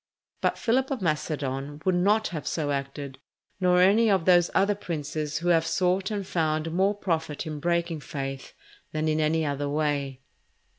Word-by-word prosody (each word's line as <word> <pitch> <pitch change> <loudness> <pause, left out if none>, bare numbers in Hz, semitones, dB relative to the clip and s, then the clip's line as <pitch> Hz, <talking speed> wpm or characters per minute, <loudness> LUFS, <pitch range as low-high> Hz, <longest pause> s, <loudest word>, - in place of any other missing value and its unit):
But - - +1
Philip 255 +3 +1
of 260 -8 -3
Macedon 145 -3 -2
would 185 - +3
not 205 +5 +2
have 160 -4 -5
so 150 -3 -1
acted, 140 -1 -4 0.4
nor 180 -1 +4
any 210 +5 +5
of 190 -5 +2
those 175 -2 +5
other 200 +2 +4
princes 155 -5 -4
who 175 +2 -1
have 165 -2 +4
sought 185 +1 +1
and 205 -3 -3
found 160 -2 -1
more 190 +4 +2
profit 160 -6 -2
in 155 -2 -5
breaking 170 0 0
faith 135 -2 -6 0.4
than 155 0 -1
in 155 0 +1
any 155 +1 +1
other 145 0 -2
way. 145 -3 -1
160 Hz, 165 wpm, -26 LUFS, 145-185 Hz, 0.4 s, any